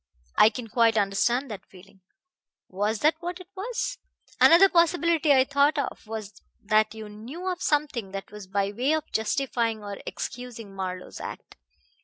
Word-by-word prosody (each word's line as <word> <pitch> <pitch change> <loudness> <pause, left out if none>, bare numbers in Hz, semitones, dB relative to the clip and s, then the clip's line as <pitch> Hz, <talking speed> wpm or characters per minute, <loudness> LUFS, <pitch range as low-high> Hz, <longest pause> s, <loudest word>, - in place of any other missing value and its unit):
I 215 - +7
can 230 +1 -7
quite 230 0 +3
understand 230 +6 +1
that 195 -2 -8
feeling. 190 +1 -17 0.7
Was 205 +3 -1
that 310 +2 +5
what 350 +1 -5
it 365 0 -13
was? 485 +5 -3 0.4
Another 345 +4 +8
possibility 335 -3 +3
I 265 -2 +6
thought 280 +2 +2
of 280 -5 -3
was 215 -3 -7 0.2
that 215 +1 +2
you 220 -1 -7
knew 240 - -8
of 365 -1 -2
something 290 -9 0
that 195 0 -7
was 210 -2 -10
by 200 +1 0
way 250 +8 +1
of 315 0 -5
justifying 225 -1 -1
or 200 -1 -6
excusing 235 -5 -6
Marlowe's 185 -1 -5
act. - - -8
230 Hz, 160 wpm, -26 LUFS, 205-305 Hz, 0.7 s, Another